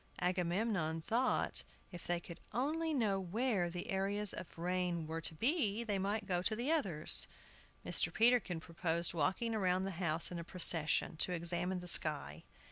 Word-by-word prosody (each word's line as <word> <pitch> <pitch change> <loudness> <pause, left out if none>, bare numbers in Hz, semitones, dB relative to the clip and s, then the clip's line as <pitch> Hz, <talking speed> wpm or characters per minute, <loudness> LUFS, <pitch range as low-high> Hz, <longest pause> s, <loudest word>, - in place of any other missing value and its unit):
Agamemnon 180 -1 -1
thought 235 +10 0 0.3
if 175 -2 -8
they 175 0 0
could 170 -1 -11 0.2
only 315 +6 -1
know 215 -9 +1
where 195 0 -1
the 175 +1 -6
areas 200 +1 -1
of 175 - -9
rain 175 -1 -2
were 160 +1 -5
to 160 - 0
be 235 - +1
they 205 -4 -1
might 205 +3 -2
go 180 -2 -1
to 215 +4 0
the 245 +7 0
others. 190 - +2 0.6
Mr. - - +5
Peterkin 225 -7 +3
proposed 170 +1 +1
walking 190 +9 -1
round 185 -3 0
the 195 - -3
house 165 0 0
in 175 - -5
a - - -5
procession, 165 -3 +1
to 180 - +3
examine 175 +2 -3
the 180 - -9
sky. 145 - +1
180 Hz, 165 wpm, -35 LUFS, 170-215 Hz, 0.6 s, Mr